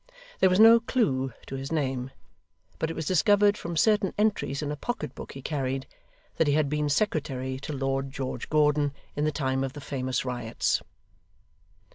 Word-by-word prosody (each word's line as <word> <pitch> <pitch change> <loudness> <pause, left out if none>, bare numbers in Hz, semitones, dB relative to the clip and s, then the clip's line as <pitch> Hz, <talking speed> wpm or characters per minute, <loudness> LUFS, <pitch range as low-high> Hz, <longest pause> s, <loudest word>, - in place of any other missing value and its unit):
There 190 - +5
was 185 +2 +2
no 225 +1 +9
clue 135 - 0
to 135 - -6
his 135 +2 -5
name; 135 -5 -1 0.7
but 160 - 0
it 165 - -4
was 160 - -4
discovered 205 +4 +4
from 170 -4 -5
certain 210 +2 +3
entries 205 -9 0
in 145 - -2
a - - -2
pocket 155 -2 -4
book - - -9
he 135 - -9
carried, 135 -3 -2 0.5
that 160 - +3
he 145 - +3
had 150 -1 +2
been 150 0 0
secretary 135 -7 -1
to 140 - -6
Lord 135 0 -1
George 135 -1 -5
Gordon 150 -2 +2 0.2
in 145 - 0
the 155 - +2
time 135 -2 -1
of 135 -1 -3
the - - -8
famous 130 -2 -2
riots. 120 -3 -1
145 Hz, 180 wpm, -27 LUFS, 135-165 Hz, 0.7 s, no